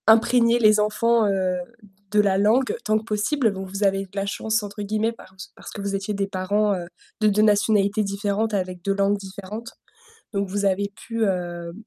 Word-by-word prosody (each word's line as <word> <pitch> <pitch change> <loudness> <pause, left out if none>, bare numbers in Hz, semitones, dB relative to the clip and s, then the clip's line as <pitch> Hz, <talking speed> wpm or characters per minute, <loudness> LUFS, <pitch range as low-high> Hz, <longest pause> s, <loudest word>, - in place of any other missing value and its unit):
Imprégner 230 +1 +5
les 215 -2 +5
enfants, 215 +1 +2
heu, 185 -2 0 0.5
de 210 - +3
la 200 -2 +3
langue 230 +6 +3
tant 215 0 +2
que 215 - -4
possible, 220 +3 0
bon, 190 -1 -6
vous 195 +2 -4
avez 195 0 +2
de - - -22
la 195 0 -1
«chance», 220 +2 -1
entre 205 0 -7
guillemets, 215 +2 0
parc 190 -4 -16 0.2
parce - - -11
que - - -8
vous 200 0 -2
étiez 195 +2 -3
des 195 0 -1
parents, 200 +2 0
heu, 175 -2 -4 0.3
de 215 - +4
2 210 0 +3
nationalités 210 0 +3
différentes, 200 +2 -1
avec 185 -2 -2
2 195 +1 0
langues 200 +1 +2
différentes, 200 +3 -8 0.6
donc 200 -1 -1
vous 200 +1 -2
avez 200 +1 +1
pu, 230 -1 -3
hem 175 -3 -3
205 Hz, 195 wpm, -23 LUFS, 195-215 Hz, 0.6 s, Imprégner